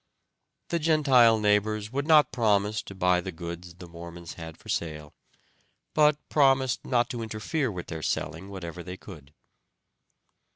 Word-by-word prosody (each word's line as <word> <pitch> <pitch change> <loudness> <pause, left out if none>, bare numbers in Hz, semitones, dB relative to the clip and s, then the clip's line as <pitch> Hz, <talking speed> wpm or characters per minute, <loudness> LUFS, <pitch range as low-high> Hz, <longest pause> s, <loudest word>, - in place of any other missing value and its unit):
The 170 - 0
Gentile 135 -8 +5
neighbors 105 +1 +1
would 140 +3 -2
not 150 -2 +6
promise 110 -3 +1
to 100 - -11
buy 90 -1 +2
the 95 - -5
goods 85 +1 -8
the 90 - -11
Mormons 85 0 -9
had 80 -2 -9
for - - -18
sale, 75 -3 -3 0.8
but 150 -1 +4
promised 135 -3 +3
not 120 -1 +1
to 120 - -4
interfere 110 +5 -2
with 90 -3 -6
their 80 -1 -6
selling 80 +5 -3
whatever 90 -3 -7
they 90 +1 -8
could. 75 -10 -12
105 Hz, 150 wpm, -27 LUFS, 85-125 Hz, 0.8 s, not